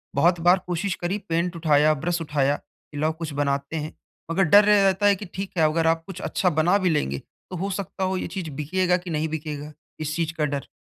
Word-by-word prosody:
बहुत 170 +4 +3
बार 175 +2 +5
कोशिश 180 +2 -1
करी 180 +4 -1
पेंट 170 +2 0
उठाया, 155 -2 +4
ब्रश 170 +3 -2
उठाया 145 -2 +1
कि 145 - -16
लाओ 155 +2 +2
कुछ 160 -3 -4
बनाते 140 +1 -1
हैं 155 0 -4 0.4
मगर 190 +3 +3
डर 200 +5 +7
रे 210 - +6
रहता 195 +1 +2
है 200 -1 +6
कि 205 - -8
ठीक 195 +1 -5
है 160 - +4
अगर 160 +1 +2
आप 165 0 +2
कुछ 185 -2 -7
अच्छा 185 - +1
बना 170 +4 +3
भी 185 -3 +1
लेंगे 70 - 0 0.3
तो 185 - -6
हो 195 +3 -2
सकता 195 -1 -4
हो 190 0 0
ये - - -3
चीज़ 185 -5 -5
बिकेगा 180 +5 0
कि 180 -1 -9
नहीं 155 0 -1
बिकेगा? 150 -1 -5 0.3
इस 155 0 -3
चीज़ 165 -1 -1
का 155 -2 0
डर। 140 -1 -3
165 Hz, 235 wpm, -24 LUFS, 150-185 Hz, 0.4 s, डर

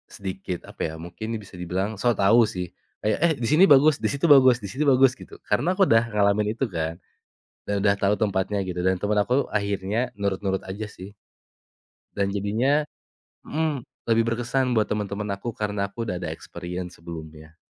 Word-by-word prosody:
sedikit 95 -2 -5
apa - - -10
ya, - - -8
mungkin 90 +5 -8
nih 110 - -3
bisa 95 -1 -14
dibilang 95 +4 -1
sok 120 -3 +2
tahu 115 +5 +6
sih. 90 -1 -3 0.4
Kayak, 105 0 +1
"Eh, 165 - +3
di - - +1
sini 160 +5 +6
bagus, 145 +2 +7
di - - +2
situ 140 +3 -1
bagus 130 -3 +6
di 100 - -4
situ 145 +4 -1
bagus," 130 0 +5
gitu. - - -13 0.2
Karena - - +1
aku 200 - 0
udah 115 0 +5
ngalamin 105 0 +2
itu 135 - +1
kan 80 0 -1 0.7
dan 100 - 0
udah 100 - +5
tahu 100 +1 +3
tempatnya 100 -1 0
gitu. 90 -1 -4
Dan 95 - +3
temen 105 0 +1
aku 125 +4 0 0.2
akhirnya 100 0 -1 0.2
nurut-nurut 95 -1 -1
aja 105 +3 -5
sih. 95 +2 -10 1.0
Dan 100 -1 0
jadinya 120 +9 +1 0.6
mmm, 155 -2 -1 0.3
lebih 115 0 +4
berkesan 125 +1 0
buat 110 -1 +1
temen-temen 105 -1 -2
aku, 110 +4 -5
karena 105 -1 -2
aku 115 +4 -6
udah 90 -5 -3
ada 90 - -4
experience 90 +1 -7
sebelumnya. 80 -1 -10
105 Hz, 185 wpm, -24 LUFS, 95-120 Hz, 1.0 s, bagus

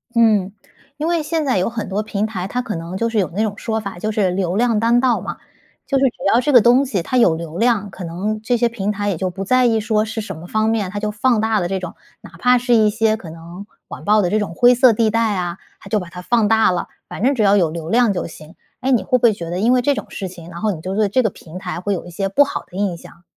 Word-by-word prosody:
嗯。 215 -5 +3 0.5
因 310 +2 -2
为 340 -2 0
现 315 0 -1
在 255 -8 +1
有 185 - +1
很 225 -4 -5
多 200 +2 -1
平 210 -1 -2
台， 190 -4 -4
它 250 +4 -2
可 225 -5 -5
能 170 +2 -6
就 230 +3 0
是 225 - -3
有 190 - +1
那 215 - 0
种 205 -1 -3
说 220 -1 -2
法， 200 -4 -7
就 215 +4 -2
是 205 -3 +1
流 180 -1 -1
量 230 -1 +2
当 235 +2 +3
道 250 -2 +2
嘛。 - - -6 0.5
就 275 -1 +1
是 270 - +3
只 245 - 0 0.2
要 235 - +5
这 275 +3 0
个 245 - +8
东 245 +4 +4
西 195 -9 -2
它 255 - -1
有 180 -9 +4
流 165 0 -7
量， 225 -4 +1
可 185 - -8
能 205 +6 -3
这 245 +2 0
些 235 0 +2
平 210 -3 -2
台 205 0 -2
也 180 - -2
就 185 +1 -1
不 190 +2 -6
在 255 +5 +3
意 225 -2 +3
说 215 0 +1
是 220 0 -4
什 205 - -7
么 175 +2 -10
方 220 +2 0
面。 215 -4 0
它 205 - -4
就 210 0 -2
放 220 +1 +1
大 220 -1 +1
了 175 - -1
这 190 0 -2
种 180 - -7 0.3
哪 - - -13
怕 250 0 +4
是 245 0 +1
一 215 -2 +5
些 220 0 +1
可 175 -7 -10
能 170 +4 -10 0.2
网 - - -9
暴 210 0 +4
的 175 - 0
这 215 - +1
种 205 -5 -3
灰 245 +1 +6
色 245 -1 +5
地 220 0 +2
带 225 -2 +1
啊， 175 0 -3 0.2
它 195 - -13
就 210 +1 +1
把 180 -2 -8
它 180 +1 -9
放 230 +1 +2
大 220 -3 +4
了， 175 - -2 0.2
反 - - -7
正 275 +2 +3
只 220 - +1
要 200 0 +5
有 170 -4 +2
流 165 -1 -6
量 230 0 +3
就 180 - -3
行。 160 +1 -13 0.2
哎， 265 +1 -1
你 245 - +3
会 255 -2 +2
不 - - -10
会 225 -3 +6
觉 170 -3 -7
得 180 +2 -3
因 235 +4 +3
为 250 - +3
这 285 +3 +2
种 - - -5
事 195 - -5
情， 175 -2 -12
然 170 +2 -9
后 215 -1 +1
你 160 - -8
就 190 +2 -4
对 210 -2 +2
这 255 +6 +2
个 220 - +2
平 175 -1 -12
台 180 -2 -5
会 205 +1 -1
有 175 - -4
一 - - -10
些 195 +3 -2
不 285 +9 +5
好 280 - -5
的 180 - -10
印 195 -4 -1
象？ 170 +1 -16
210 Hz, 325 characters per minute, -19 LUFS, 185-235 Hz, 0.5 s, 个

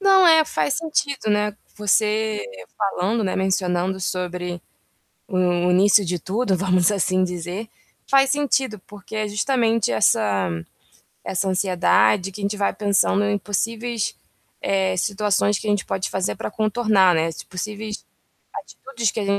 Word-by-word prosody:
Não, 390 -2 +5
é, 320 -2 +6
faz 280 - -1
sentido, 290 -7 -1
né, 210 0 +1 0.2
você 215 +1 +1 0.3
falando, 205 +2 0
né, 190 - -1
mencionando 190 -1 0
sobre 180 -1 -3 0.7
o 180 -3 +1
início 195 +2 +5
de 175 0 -2
tudo, 200 +4 -1
vamos 185 0 +2
assim 185 -2 +1
dizer, 180 +4 -4 0.4
faz 270 0 +4
sentido, 270 -6 0
porque 205 +1 -11
é 215 0 -1
justamente 225 - +1
essa 100 -4 +2 0.7
essa 195 +1 -2
ansiedade 185 - +2
que 205 - -9
a - - -6
gente 200 +1 -1
vai 200 - 0
pensando 200 0 +2
em 205 0 +1
possíveis, 225 +3 -2 0.5
eh, 190 -1 0
situações 205 +1 +1
que 215 - -7
a - - +1
gente 205 -2 0
pode 190 0 -2
fazer 190 0 -2
para - - -5
contornar, 215 -3 +2
né, 160 0 +1
as 165 - -7
possíveis 210 +3 -6 0.5
atitudes 235 -6 -4
que - - -4
a - - -3
200 Hz, 145 wpm, -22 LUFS, 185-220 Hz, 0.7 s, é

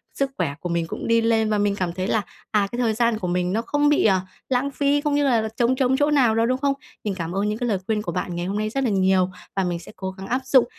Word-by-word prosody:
sức 275 -1 0
khỏe 140 - -1
của 175 - -5
mình 170 -1 -1
cũng - - -5
đi 230 0 +4
lên 225 -1 +2
và 210 - +1
mình 205 -1 +1
cảm 180 -3 -2
thấy 185 +1 -3
là, 220 - +1 0.3
à, 205 -2 +2
cái 240 - -4
thời 230 -3 +2
gian 230 -1 +1
của 180 - -3
mình 180 +1 0
nó 225 - +1
không 290 +4 +1
bị, 295 - +3
ờ, 190 -3 +4 0.3
lãng 265 +2 +1
phí, 285 +1 +1
cũng 295 -1 0
như 290 - +2
là 245 -5 +3
là 220 - -3
trống 240 +2 +3
trống 260 0 +2
chỗ 290 +1 +2
nào 250 -6 +4
đâu, 225 0 +3
đúng 255 +1 +1
không? 280 0 +1 0.3
Mình 205 - -1
cảm 170 -2 -4
ơn 205 +2 +1
những 215 - -2
cái 245 -1 -2
lời 200 - +1
khuyên 215 -1 0
của 190 -5 -4
bạn 175 +1 -3
ngày 175 0 -3
hôm 200 +2 -2
nay 215 0 -1
rất 270 +4 -1
là 245 - +1
nhiều 190 -2 +3 0.3
và 195 - +1
mình 175 -1 -2
sẽ 170 - -12
cố 190 -1 -4
gắng 190 +1 -9
áp 255 +2 0
dụng 260 -1 +5
220 Hz, 315 wpm, -23 LUFS, 190-255 Hz, 0.3 s, dụng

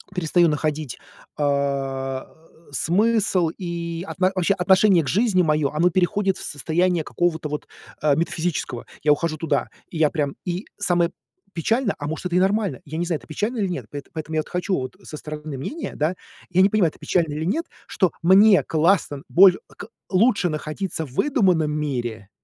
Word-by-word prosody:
перестаю 175 0 +3
находить, 150 -3 -2 0.4
а, 135 -2 -1 0.4
смысл 190 +1 +2
и 170 -1 -4
от - - -7
вообще 185 0 +2
отношение 190 -1 +4
к - - -7
жизни 205 -2 +3
моё 150 -3 +2
оно 165 +4 +2
переходит 190 +2 +1
в - - -8
состояние 170 +3 0
какого-то 160 -3 -1
вот, 150 - -5 0.3
э, 150 -2 +3
метафизического. 165 -6 -2 0.2
Я 150 - +4
ухожу 155 +2 +1
туда, 150 -3 0 0.2
и 170 - -7
я 155 -2 +4
прям 145 -4 -2
И 180 +3 -3
самое 175 -4 +1 0.4
печальное, 225 - 0
а 145 - -4
может, 160 +3 -3
это 175 0 0
и - - +5
нормально, 195 - +1
я 155 +2 -6
не 175 - -1
знаю, 165 -3 -1
это - - -18
печально 210 - -2
или 200 -3 0
нет. 175 - -4
Поэт 145 -1 -7
поэтому 160 0 -5
я, - - +2
вот, - - -12
хочу, 180 +2 -2
вот, 130 +6 -5
со 150 - -8
стороны 150 -2 -7
мнения, 295 - -5
да, 155 +5 0 0.3
я 185 +1 +3
не 195 - +5
понимаю, 195 -6 +3
это - - -21
печально 165 -4 0
или 155 +1 -3
нет, 315 - -1 0.2
что 185 -4 +1
мне 195 +3 +6
классно 160 -3 +1
боль 185 0 +7 0.2
к 205 - -9 0.2
лучше 200 0 +3
находиться 160 +2 -3
в 130 - -14
выдуманном 180 - +2
мире, 120 -8 -3
170 Hz, 180 wpm, -23 LUFS, 150-185 Hz, 0.4 s, боль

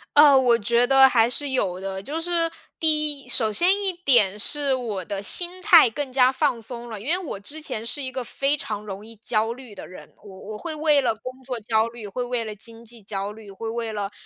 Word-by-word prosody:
呃， 290 -2 +8
我 245 -3 +4
觉 235 +3 +2
得 270 0 +7
还 235 -3 +3
是 285 +3 -2
有 190 -8 -1
的。 190 0 -5
就 290 +10 -4
是 335 -1 0 0.3
第 305 -2 +3
一 - - -18
首 220 -3 +1
先 345 - +3
一 390 -2 0
点 240 - +3
是 285 +4 +2
我 220 -8 -3
的 200 +1 -4
心 355 - -1
态 335 -8 +7
更 270 +4 -5
加 255 0 +4
放 265 -2 0
松 240 +1 -7
了， 220 -2 -6
因 215 - -10
为 340 +4 +2
我 335 - -6
之 290 +10 -8
前 230 -7 -4
是 285 +5 -2
一 260 -1 -4
个 260 0 -4
非 275 +4 -1
常 210 -6 -5
容 200 0 -8
易 225 +1 -13
焦 220 +1 -1
虑 245 -4 -13
的 - - -9
人。 185 - -12
我 190 -2 -12
我 215 - -6
会 325 +7 -6
为 300 -1 +3
了 245 - +1
工 255 +4 -10
作 250 -2 -4
焦 220 0 +1
虑， 230 -2 -9
会 245 +5 -4
为 245 -1 -2
了 215 -1 -6
经 230 +2 -8
济 235 0 -7
焦 200 0 -4
虑， 210 -1 -12
会 225 +4 -6
为 230 -1 -4
了， 205 -1 -3
240 Hz, 255 characters per minute, -23 LUFS, 215-285 Hz, 0.3 s, 呃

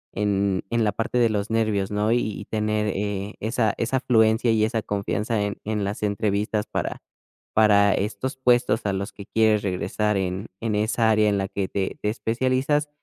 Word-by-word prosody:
en 100 -2 +1 0.2
la 105 - +2
parte 115 +4 -2
de 120 -2 +4
los 105 -1 -2
nervios, 110 -3 0
¿no? 105 +2 +1
Y - - +3
y 105 -3 -4
tener, 105 0 -1
eh, 100 0 -3
esa 110 0 +1
esa 120 +3 0
afluencia, 115 -2 +3
y 110 -1 +2
esa 110 +1 0
confianza 105 +2 -2
en 100 0 -3
en 105 -1 -1
las 100 +2 -3
entrevistas 105 +1 0
para - - -3 0.5
para 100 -2 +5
estos 105 +6 -3
puestos 125 -3 +2
a 100 - +1
los 100 +2 -3
que 100 - -10
quieres 110 -1 +2
regresar, 105 +2 -1
en 95 +2 -2
en 110 -2 -1
esa 110 +2 +1
área 110 -1 +4
en 100 - +1
la 95 0 -1
que 100 -2 -2
te 95 0 -3
te 105 - 0
especializas. 130 +6 0
105 Hz, 185 wpm, -24 LUFS, 100-115 Hz, 0.5 s, para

